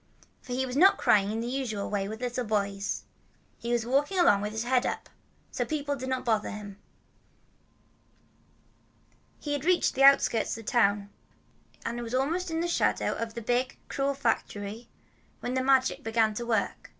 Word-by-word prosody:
For 250 - -7
he 260 +1 0
was 250 -1 -5
not 375 +7 +6
crying 200 -1 +3
in 225 +1 -2
the 235 - -3
usual 245 -6 -3
way 200 -1 -2
with 220 +3 -7
little 250 0 -2
boys. 200 -2 -1 0.6
He 235 - -4
was 240 -2 +1
walking 285 +9 +1
along 205 - +5
with 210 +1 -3
his 220 +1 -3
head 250 +1 +2
up. - - -3 0.4
So - - -1
people 290 -2 -2
did 260 -1 -5
not 260 0 -2
bother 220 -3 +1
him. 205 -1 -8 2.6
He 290 - -3
had 285 -2 -2
reached 360 +1 +2
the 270 - -2
outskirts 275 -5 +5
of 225 - -10
the - - -3
town, 205 -4 +2 0.7
and 235 +1 -3
was 235 +1 -4
almost 330 +8 0
in 325 0 -1
the 345 - 0
shadow 345 - +1
of 230 -1 -5
the 235 - -5
big, 245 +3 0
cruel 275 0 -1
factory, 225 -3 -2 0.5
when 245 - -3
the 260 - +1
Magic 265 -1 +2
began 225 -1 +2
to 235 +2 -5
work. 220 -4 -1
240 Hz, 180 wpm, -28 LUFS, 215-270 Hz, 2.6 s, not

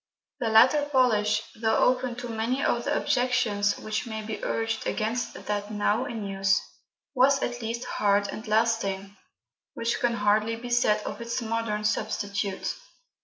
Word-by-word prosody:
The 235 -4 0
latter 260 +7 +5
polish, 245 -6 +3
though 220 0 +1
open 255 -1 +2
to 245 0 -6
many 235 +4 -1
of 240 - +1
the - - +1
objections 240 -5 +1
which 215 +2 -3
may 220 -1 -5
be 215 0 -6
urged 225 -1 -1
against 225 +3 -2
that 205 0 -2
now 205 0 +1
in 225 -4 -5
use, 195 0 +2 0.5
was 270 +1 +4
at 245 0 -3
least 230 +2 -3
hard 200 -3 +1
and 220 +3 -7
lasting, 210 -3 0 0.6
which 230 0 -1
can 240 -1 +1
hardly 215 +1 +2
be 240 +2 -8
said 215 -3 +3
of - - -6
its 235 +1 -2
modern 225 -2 -2
substitute. 205 -2 -1
225 Hz, 155 wpm, -27 LUFS, 210-240 Hz, 0.6 s, latter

